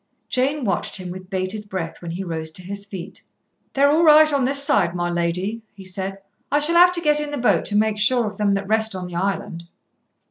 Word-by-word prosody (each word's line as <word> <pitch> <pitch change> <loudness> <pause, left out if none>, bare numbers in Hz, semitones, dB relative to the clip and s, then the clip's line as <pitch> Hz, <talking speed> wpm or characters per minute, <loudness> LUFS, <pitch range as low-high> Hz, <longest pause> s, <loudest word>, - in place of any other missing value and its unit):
Jane 270 +2 0
watched 195 0 -1
him 185 -2 -7
with 185 0 -10
bated 195 +2 -4
breath 180 -4 -5
when 170 - -7
he 175 +4 -5
rose 160 -3 -4
to 185 - -6
his 200 +2 -7
feet. 190 -4 -8 0.5
"They're 280 +1 +4
all 320 +3 +3
right 310 -1 +6
on 275 -3 +1
this 280 +2 +4
side, 195 -9 +2
my 175 0 -2
lady," 180 +6 -2
he 195 -1 -12
said. 190 +1 -3 0.3
"I 290 - +3
shall 295 +3 +3
have 360 +1 +7
to 345 - -2
get 300 -2 +2
in 295 0 -3
the 290 - -4
boat 245 - +1
to 205 - -1
make 215 0 +1
sure 240 +2 +4
of 210 - -6
them 200 -1 +2
that 195 0 -4
rest 220 -1 +1
on 185 -1 -5
the 180 -1 -8
island." 185 -2 -3
200 Hz, 235 wpm, -21 LUFS, 185-270 Hz, 0.5 s, have